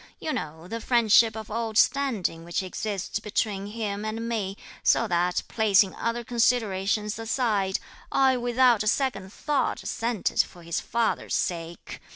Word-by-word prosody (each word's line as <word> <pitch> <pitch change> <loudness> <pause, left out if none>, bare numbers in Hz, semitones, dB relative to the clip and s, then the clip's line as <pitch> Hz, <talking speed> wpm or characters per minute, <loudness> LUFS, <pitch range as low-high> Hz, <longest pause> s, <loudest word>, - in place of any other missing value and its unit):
You 310 - -3
know 160 +3 -5
the 230 +3 -5
friendship 230 -1 +4
of 220 -1 -7
old 225 -1 -2
standing 240 -12 +2
which 170 +2 -2
exists 200 +2 -3
between 205 -2 -2
him 210 -1 -4
and 225 +1 -3
me, 205 -4 -2 0.2
so 230 - +3
that, 175 -1 +1
placing 200 -3 +3
other 230 +1 -2
considerations 215 -3 +1
aside, 220 -5 0 0.3
I 265 -1 +4
without 245 -1 +3
a 215 - -2
second 210 -6 0
thought, 290 +4 -1
assented 230 -3 -2
for 175 - -11
his 170 0 -2
father's 235 0 -1
sake. 170 -1 -4
215 Hz, 145 wpm, -26 LUFS, 195-235 Hz, 0.3 s, friendship